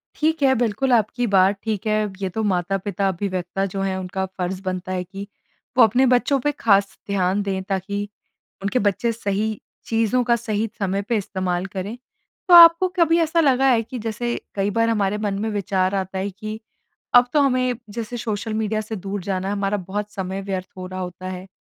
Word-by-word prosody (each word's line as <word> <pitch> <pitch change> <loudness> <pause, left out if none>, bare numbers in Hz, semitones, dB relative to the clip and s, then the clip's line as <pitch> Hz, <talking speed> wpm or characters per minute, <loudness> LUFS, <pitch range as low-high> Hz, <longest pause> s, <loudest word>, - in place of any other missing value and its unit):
ठीक 315 0 0
है। 265 -1 +5
बिल्कुल, 240 +3 0
आपकी 235 +2 +2
बात 195 0 +4
ठीक 215 -2 -3
है। 215 0 +2 0.2
ये 190 - -1
तो 220 +5 -3
माता-पिता, 195 +1 0
अभिव्यक्ता 185 0 -2
जो 195 - -2
हैं 195 -1 -1
उनका 190 +1 -3
फर्ज़ 185 +1 -3
बनता 185 -1 -3
है 185 -1 -1
कि 195 +2 -8 0.5
वो 250 - +9
अपने 245 +4 +4
बच्चों 270 +3 +2
पे 295 +3 0
ख़ास 200 -8 +2
ध्यान 195 0 +1
दें 195 -1 -2
ताकि 200 +1 -2 0.6
उनके 200 +6 +1
बच्चे 230 +4 +1
सही 215 -1 -2 0.3
चीज़ों 230 +2 +1
का 240 0 +3
सही 220 -1 -2
समय 195 0 0
पे 235 - +2
इस्तेमाल 185 -2 -2
करें। 195 +4 -5 0.5
तो 360 - +5
आपको 340 +1 +9
कभी 335 -2 +4
ऐसा 330 0 +2
लगा 270 -4 +4
है 235 -3 +4
कि 245 +3 -7
जैसे 230 +2 -2 0.2
कई 200 0 0
बार 230 0 +3
हमारे 210 -2 +1
मन 210 -1 -2
में 220 +2 -1
विचार 195 -2 0
आता 190 0 -3
है 190 +2 -2
कि, 215 +3 -7 0.5
अब 245 0 +7
तो 295 - +4
हमें 255 -2 +2
जैसे 230 +2 -5
सोशल 220 -1 -3
मीडिया 215 0 -1
से 215 +1 -6
दूर 195 0 -5
जाना 190 0 -2
है, 200 - -1
हमारा 200 0 0
बहुत 205 +3 -4
समय 190 0 -4
व्यर्थ 190 -2 -4
हो 185 - -6
रहा 185 0 -6
होता 185 0 -6
है। 185 0 -7
205 Hz, 195 wpm, -22 LUFS, 190-230 Hz, 0.6 s, वो